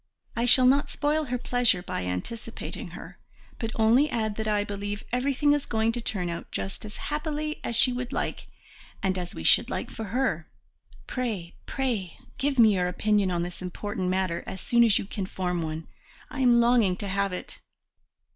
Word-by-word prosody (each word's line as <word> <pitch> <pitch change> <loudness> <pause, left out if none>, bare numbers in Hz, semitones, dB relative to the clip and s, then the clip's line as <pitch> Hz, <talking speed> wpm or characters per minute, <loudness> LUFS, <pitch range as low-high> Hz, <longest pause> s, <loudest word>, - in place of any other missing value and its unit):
I 235 - +1
shall 255 +1 +8
not 275 +3 +4
spoil 300 +1 0
her 250 -2 -1
pleasure 245 -7 +1
by 90 - -3
anticipating 90 - -5
her, - - -10 0.4
but 225 -1 -2
only 235 +7 +4
add 220 -4 -1
that 220 0 -2
I 210 -1 +2
believe 205 +1 -4
everything 280 +4 +2
is 290 -1 -1
going 220 0 +1
to 240 +1 -3
turn 195 -6 -2
out 170 0 -5
just 195 - -4
as 210 - -9
happily 305 0 -3
as 235 - -2
she 250 +3 +5
would 245 +1 -4
like - - -3 0.6
and 190 -1 +1
as 180 -1 -5
we 80 - -6
should - - +6
like - - -3
for 225 - -5
her. 205 -7 -1 0.6
Pray, 215 -9 -3
pray, 230 - -2 0.2
give 275 0 0
me 220 -3 +7
your 180 -2 +1
opinion 205 +2 +1
on 175 -1 0
this 175 +1 -7
important 185 +1 -3
matter 185 -2 0
as 190 - -6
soon 235 +5 +4
as 225 -4 +5
you - - -2
can 195 -1 -4
form 180 -2 -2
one. 160 0 -4 0.4
I 280 - -5
am 245 -2 +5
longing 235 -6 +4
to 200 - -4
have 200 0 0
it." 180 - -6
220 Hz, 190 wpm, -27 LUFS, 185-250 Hz, 0.6 s, shall